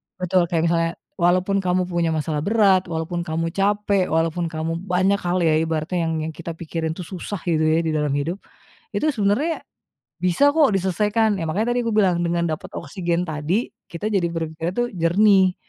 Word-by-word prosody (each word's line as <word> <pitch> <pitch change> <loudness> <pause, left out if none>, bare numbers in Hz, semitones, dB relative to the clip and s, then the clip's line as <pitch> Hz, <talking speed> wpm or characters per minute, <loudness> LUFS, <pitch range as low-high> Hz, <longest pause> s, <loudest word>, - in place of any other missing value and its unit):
betul 180 -1 +1
kayak 165 -2 0
misalnya, 165 0 +1 0.3
walaupun 185 +3 +2
kamu 185 -1 +1
punya 170 -1 +1
masalah 155 -1 -1
berat, 195 0 +3
walaupun 165 +1 -3
kamu 165 +1 -2
capek, 200 0 +1
walaupun 165 +1 0
kamu 165 +1 -3
banyak 190 +2 +1
hal 180 -1 0
ya 155 -1 +3
ibaratnya 165 +2 -1
yang 160 0 -2
kita 165 +1 -7
pikirin 160 -1 -4
itu 180 - -6
susah 185 +3 -6
gitu 165 -3 +1
ya 160 +2 +2
di 160 - -1
dalam 150 -2 0
hidup, 165 +7 -2 0.6
itu 310 - +1
sebenarnya 240 +8 0 0.6
bisa 180 +12 +3
kok 310 -4 +5
diselesaikan, 210 +3 +1
ya - - -2
makanya 210 +9 0
tadi 245 - +1
aku 230 - 0
bilang 190 -5 +3
dengan 170 0 0
dapat 155 - -5
oksigen 170 +2 -2
tadi, 160 +9 -1 0.2
kita 170 +5 -3
jadi 190 -4 +2
berpikirnya 165 0 -3
tuh 240 0 0
jernih, 185 +2 +4
175 Hz, 175 wpm, -22 LUFS, 165-195 Hz, 0.6 s, kok